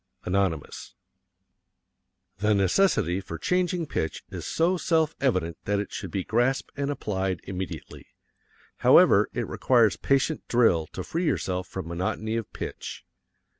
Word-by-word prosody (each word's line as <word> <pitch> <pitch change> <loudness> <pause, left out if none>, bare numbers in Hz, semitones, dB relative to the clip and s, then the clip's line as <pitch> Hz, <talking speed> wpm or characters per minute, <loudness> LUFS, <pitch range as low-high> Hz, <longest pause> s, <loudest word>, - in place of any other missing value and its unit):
Anonymous. 90 -5 -2 1.4
The 105 +1 +3
necessity 95 - +2
for 85 -3 -7
changing 180 - 0
pitch 80 - -3
is - - -6
so 170 +3 +2
self 160 -3 +1
evident 90 - 0
that 100 0 +1
it 100 - -5
should 100 -5 -5
be 95 +2 -2
grasped 120 +6 0
and 140 0 -2
applied 95 -9 -2
immediately. 95 -3 -7 0.7
However, - - +6
it - - -3
requires 120 -5 +3
patient 140 +3 +1
drill 100 -10 +3
to - - -4
free 170 +2 -2
yourself 90 - -1
from 95 -3 -6
monotony 95 +6 -2
of 115 -2 -4
pitch. - - -7
105 Hz, 130 wpm, -26 LUFS, 90-140 Hz, 1.4 s, However